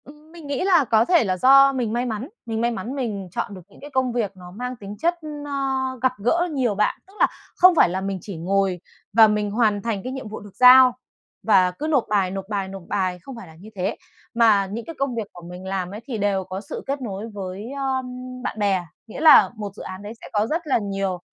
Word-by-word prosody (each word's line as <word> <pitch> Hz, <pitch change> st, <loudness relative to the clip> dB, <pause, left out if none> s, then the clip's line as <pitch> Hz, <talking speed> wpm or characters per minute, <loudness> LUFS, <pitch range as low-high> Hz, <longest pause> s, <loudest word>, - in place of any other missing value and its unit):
Ừm, 300 Hz, +2 st, -16 dB
mình 330 Hz, -3 st, -11 dB
nghĩ 280 Hz, +3 st, -2 dB
là 355 Hz, -7 st, +4 dB
có 225 Hz, -1 st, +3 dB
thể 345 Hz, 0 st, +4 dB
là 185 Hz, -3 st, -1 dB
do 275 Hz, +5 st, +6 dB
mình 240 Hz, -4 st, -2 dB
may 240 Hz, +1 st, 0 dB
mắn, 235 Hz, +3 st, -4 dB, 0.2 s
mình 225 Hz, -1 st, -3 dB
may 235 Hz, +1 st, +1 dB
mắn 230 Hz, +4 st, -5 dB
mình 215 Hz, -8 st, -3 dB
chọn 205 Hz, -, -3 dB
được 185 Hz, -, -9 dB
những -, -, -19 dB
cái 290 Hz, -, -9 dB
công 260 Hz, -3 st, 0 dB
việc 225 Hz, -5 st, -1 dB
nó 180 Hz, -1 st, -11 dB
mang 250 Hz, +6 st, -5 dB
tính 205 Hz, -2 st, -9 dB
chất, 340 Hz, +7 st, +1 dB, 0.3 s
ơ, 290 Hz, -, -7 dB, 0.5 s
gặp 260 Hz, 0 st, +3 dB
gỡ 340 Hz, +9 st, +2 dB
nhiều 250 Hz, -7 st, 0 dB
bạn. 210 Hz, +1 st, 0 dB
Tức 390 Hz, -, -20 dB
là -, -, +5 dB, 0.3 s
không 365 Hz, -1 st, +6 dB
phải 310 Hz, -, +5 dB
là 185 Hz, +2 st, -2 dB
mình 195 Hz, 0 st, -3 dB
chỉ 195 Hz, -2 st, -8 dB
ngồi 190 Hz, +2 st, 0 dB, 0.3 s
và 220 Hz, 0 st, +8 dB
mình 210 Hz, -1 st, 0 dB
hoàn 210 Hz, -2 st, +2 dB
thành 220 Hz, -3 st, -2 dB
cái 255 Hz, -, -4 dB
nhiệm 265 Hz, -3 st, -6 dB
vụ 215 Hz, -, -7 dB
được 205 Hz, -2 st, -14 dB
giao, 255 Hz, 0 st, +8 dB, 0.5 s
và 190 Hz, -4 st, +4 dB
cứ 290 Hz, +12 st, -5 dB
nộp 285 Hz, -6 st, +2 dB
bài, 195 Hz, -3 st, +1 dB
nộp 195 Hz, 0 st, -5 dB
bài, 200 Hz, -2 st, -2 dB
nộp 190 Hz, -1 st, -9 dB
bài, 185 Hz, -3 st, -1 dB
không 270 Hz, +6 st, -10 dB
phải 230 Hz, -6 st, -10 dB
là 160 Hz, -, -15 dB
như 195 Hz, +7 st, -13 dB
thế. 185 Hz, 0 st, -2 dB, 0.4 s
Mà 220 Hz, -4 st, +4 dB
những 230 Hz, +2 st, -5 dB
cái 330 Hz, -, -8 dB
công 275 Hz, -3 st, -1 dB
việc 225 Hz, -3 st, -3 dB
của 175 Hz, -, -12 dB
mình 180 Hz, +1 st, -9 dB
làm 190 Hz, -1 st, -3 dB
ấy, 210 Hz, -, -6 dB
thì 245 Hz, -5 st, -4 dB
đều 200 Hz, -2 st, 0 dB
có 185 Hz, +1 st, -6 dB
sự 200 Hz, -, -7 dB
kết 275 Hz, 0 st, -2 dB
nối 215 Hz, -1 st, -5 dB
với, 200 Hz, +4 st, -6 dB
ơm, 265 Hz, -2 st, -2 dB, 0.4 s
bạn 220 Hz, -, -4 dB
bè. 195 Hz, -3 st, +1 dB, 0.2 s
Nghĩa 225 Hz, -, -8 dB
là 315 Hz, -2 st, +8 dB
một 210 Hz, -2 st, -6 dB
dự -, -, -9 dB
án 185 Hz, +1 st, -8 dB
đấy 205 Hz, +2 st, -7 dB
sẽ -, -, -10 dB
có 210 Hz, +1 st, +1 dB
rất 325 Hz, +3 st, -2 dB
là 275 Hz, -, +3 dB
nhiều 195 Hz, -3 st, -2 dB
215 Hz, 255 wpm, -23 LUFS, 195-260 Hz, 0.5 s, và